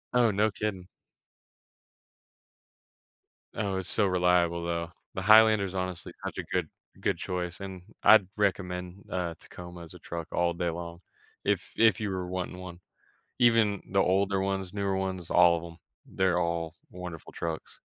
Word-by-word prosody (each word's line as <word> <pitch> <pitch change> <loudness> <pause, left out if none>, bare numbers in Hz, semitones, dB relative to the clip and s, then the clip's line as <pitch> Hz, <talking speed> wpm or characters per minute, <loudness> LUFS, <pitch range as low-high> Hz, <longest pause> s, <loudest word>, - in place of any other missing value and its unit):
Oh, 120 -2 +5
no 105 +2 +2
kidding. 95 -3 -4 2.7
Oh, 100 -3 -1
it's 95 -2 -3
so 100 -2 +2
reliable, 90 -2 +2
though. 85 -1 -2 0.2
The 95 - -3
Highlander's 110 -2 +6
honestly 90 -2 -3
such - - -4
a - - -2
good - - -1 0.3
good - - 0
choice, 90 -1 -3
and 95 -2 -7 0.2
I'd 110 -4 +7
recommend, 90 -2 -2
uh, 90 -2 -1
Tacoma 90 0 -10
as 85 +1 -12
a 90 - -12
truck 85 0 -6
all 85 0 +1
day 85 0 -1
long 85 +1 -6 0.4
if 100 -2 0
if 110 -4 +5
you 105 -2 -2
were 95 -1 -2
wanting 90 0 -4
one. 90 -1 -9 0.6
Even 115 -4 +4
the 95 - +2
older 95 +1 +2
ones, 95 -1 -2
newer 100 -1 0
ones, 95 -3 -3
all 85 -1 +6
of 80 - -7
'em, 85 -1 -10 0.3
they're 95 -2 +1
all 85 -1 -1
wonderful 90 -3 -8
trucks. 80 -1 -5
90 Hz, 155 wpm, -29 LUFS, 85-100 Hz, 2.7 s, I'd